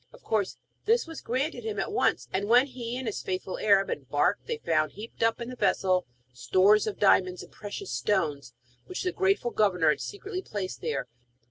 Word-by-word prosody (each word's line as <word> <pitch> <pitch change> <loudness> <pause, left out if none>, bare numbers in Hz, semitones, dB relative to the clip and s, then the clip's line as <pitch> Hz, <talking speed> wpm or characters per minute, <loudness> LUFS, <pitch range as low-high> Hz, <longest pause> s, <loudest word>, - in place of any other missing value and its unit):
Of - - -17
course 210 -3 -1 0.3
this 460 +3 +3
was 325 -1 -8
granted 255 +1 -2
him 215 -2 -3
at - - -2
once, 415 - +1
and 200 +2 -1
when 245 +3 +6
he 245 -3 -5
and 260 - -5
his 220 - -3
faithful 185 0 -4
Arab 200 -2 +4
embarked 145 +7 0
they 465 0 -2
found, - - 0
heaped 220 +3 -10
up 225 +1 +2
in 235 0 -5
the 255 - -6
vessel, 185 - +1 0.3
stores 195 - +4
of 210 - -3
diamonds 185 -2 +3
and - - -15
precious 210 - -7
stones, 145 -11 -1 0.3
which 370 - -4
the 365 - 0
grateful 380 -11 +1
governor 180 -8 +3
had 150 - +1
secretly 405 -2 -5
placed 185 - -5
there. 125 - -2
215 Hz, 195 wpm, -28 LUFS, 185-255 Hz, 0.3 s, when